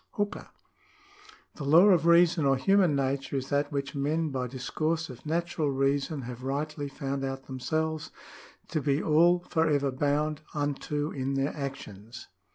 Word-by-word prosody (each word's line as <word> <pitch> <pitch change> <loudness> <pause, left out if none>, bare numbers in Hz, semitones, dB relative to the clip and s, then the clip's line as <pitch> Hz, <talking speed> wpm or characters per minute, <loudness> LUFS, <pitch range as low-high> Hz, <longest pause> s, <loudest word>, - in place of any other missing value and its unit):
^ - - -37
Hooker. 205 0 -2 0.3
— 400 0 -28
" 430 - -24
The 150 - -5
law 165 +8 +6
of 170 -4 +4
reason 170 -1 +5
or 135 -1 +3
human 185 +2 +3
nature 135 0 -1
is 130 0 -4
that 145 +1 0
which 140 -1 -3
men 150 +2 -1
by 130 -2 -2
discourse 155 +6 -2
of 125 +4 -12
natural 165 -1 -1
reason 135 +1 0
have 125 0 -7
rightly 145 +2 -3
found 135 0 -4
out 135 0 -4
themselves 155 +4 -2 0.6
to 155 -2 -1
be 140 0 +1
all 170 +3 +4
for 160 -1 +2
ever 140 -2 +1
bound 145 +3 0
unto 145 +1 -2
in 135 0 -2
their 135 +2 -1
actions." 120 -6 -7
145 Hz, 165 wpm, -28 LUFS, 135-160 Hz, 0.6 s, law